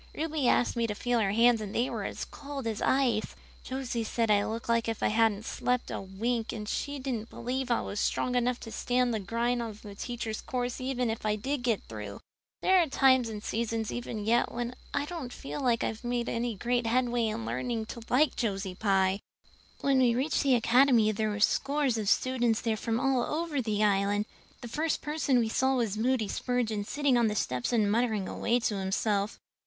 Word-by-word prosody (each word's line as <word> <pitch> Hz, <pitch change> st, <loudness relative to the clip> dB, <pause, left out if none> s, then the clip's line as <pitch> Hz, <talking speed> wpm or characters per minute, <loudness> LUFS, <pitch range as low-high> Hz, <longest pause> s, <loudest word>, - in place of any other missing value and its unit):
Ruby 310 Hz, -4 st, -1 dB
asked 245 Hz, -, +3 dB
me 235 Hz, -1 st, +1 dB
to 210 Hz, -, -3 dB
feel 245 Hz, +2 st, 0 dB
her 205 Hz, -3 st, +2 dB
hands 230 Hz, +1 st, +4 dB
and 205 Hz, -1 st, -6 dB
they 240 Hz, +2 st, +2 dB
were -, -, -4 dB
as -, -, -4 dB
cold 280 Hz, -3 st, -7 dB
as 220 Hz, -2 st, -2 dB
ice. 250 Hz, -5 st, +1 dB, 0.3 s
Josie 255 Hz, -3 st, -3 dB
said 225 Hz, 0 st, 0 dB
I 205 Hz, -1 st, +4 dB
looked 225 Hz, +1 st, -4 dB
as 230 Hz, 0 st, +3 dB
if 225 Hz, -1 st, -3 dB
I -, -, +3 dB
hadn't 220 Hz, -1 st, +2 dB
slept 250 Hz, 0 st, -1 dB
a -, -, -3 dB
wink 225 Hz, +4 st, -2 dB
and 210 Hz, -2 st, -6 dB
she 285 Hz, +6 st, -2 dB
didn't 250 Hz, -5 st, -4 dB
believe 255 Hz, +2 st, -3 dB
I 235 Hz, -, +2 dB
was 205 Hz, -, -4 dB
strong 250 Hz, -, 0 dB
enough 245 Hz, 0 st, +1 dB
to 225 Hz, -, -8 dB
stand 245 Hz, 0 st, +1 dB
the 220 Hz, -, 0 dB
grind 235 Hz, +5 st, -1 dB
of 220 Hz, -2 st, -7 dB
the 205 Hz, -2 st, -8 dB
teacher's 225 Hz, +1 st, -4 dB
course 250 Hz, -3 st, -3 dB
even 250 Hz, -3 st, 0 dB
if 225 Hz, -, -5 dB
I 210 Hz, -1 st, +1 dB
did 265 Hz, +6 st, -2 dB
get 235 Hz, -4 st, 0 dB
through. 105 Hz, -2 st, -7 dB, 0.4 s
There 375 Hz, 0 st, +5 dB
are 335 Hz, -, +1 dB
times 260 Hz, -3 st, +4 dB
and 210 Hz, -1 st, -6 dB
seasons 225 Hz, -1 st, -2 dB
even 230 Hz, -3 st, -4 dB
yet 235 Hz, +2 st, +2 dB
when 240 Hz, +1 st, -3 dB, 0.2 s
I 285 Hz, 0 st, -1 dB
don't 295 Hz, -6 st, -6 dB
feel 280 Hz, +3 st, -6 dB
that 235 Hz, -2 st, +2 dB
I've 220 Hz, +2 st, -3 dB
made 240 Hz, 0 st, -1 dB
any 235 Hz, -1 st, -1 dB
great 240 Hz, +3 st, 0 dB
headway 240 Hz, -1 st, +1 dB
in 115 Hz, -, -3 dB
learning 130 Hz, -, -2 dB
to 235 Hz, -, -9 dB
like 275 Hz, +3 st, +3 dB
Josie 195 Hz, -4 st, -2 dB
Pye! 195 Hz, -1 st, +2 dB, 0.6 s
"When 275 Hz, -1 st, +3 dB
we 245 Hz, -2 st, +4 dB
reached 275 Hz, +5 st, +1 dB
the 275 Hz, -3 st, +4 dB
Academy 240 Hz, -1 st, +4 dB
there 215 Hz, 0 st, -1 dB
were 205 Hz, -1 st, -3 dB
scores 275 Hz, +2 st, +2 dB
of 205 Hz, -2 st, 0 dB
students 240 Hz, -2 st, +2 dB
there 225 Hz, -2 st, 0 dB
from 225 Hz, +1 st, -1 dB
all 270 Hz, -1 st, +2 dB
over 305 Hz, +1 st, -1 dB
the 215 Hz, -2 st, 0 dB
Island. 205 Hz, 0 st, +2 dB, 0.4 s
The 240 Hz, -, -6 dB
first 305 Hz, +6 st, -1 dB
person 295 Hz, -3 st, +1 dB
we 230 Hz, -2 st, +2 dB
saw 265 Hz, +3 st, +2 dB
was 230 Hz, -5 st, 0 dB
Moody 230 Hz, 0 st, +1 dB
Spurgeon 225 Hz, -3 st, -1 dB
sitting 280 Hz, 0 st, +2 dB
on 235 Hz, -, +3 dB
the 210 Hz, -, -1 dB
steps 125 Hz, -10 st, -1 dB
and 215 Hz, -4 st, +2 dB
muttering 220 Hz, -4 st, +1 dB
away 240 Hz, +1 st, 0 dB
to 210 Hz, -3 st, 0 dB
himself. 200 Hz, +2 st, 0 dB
235 Hz, 210 wpm, -29 LUFS, 215-255 Hz, 0.6 s, There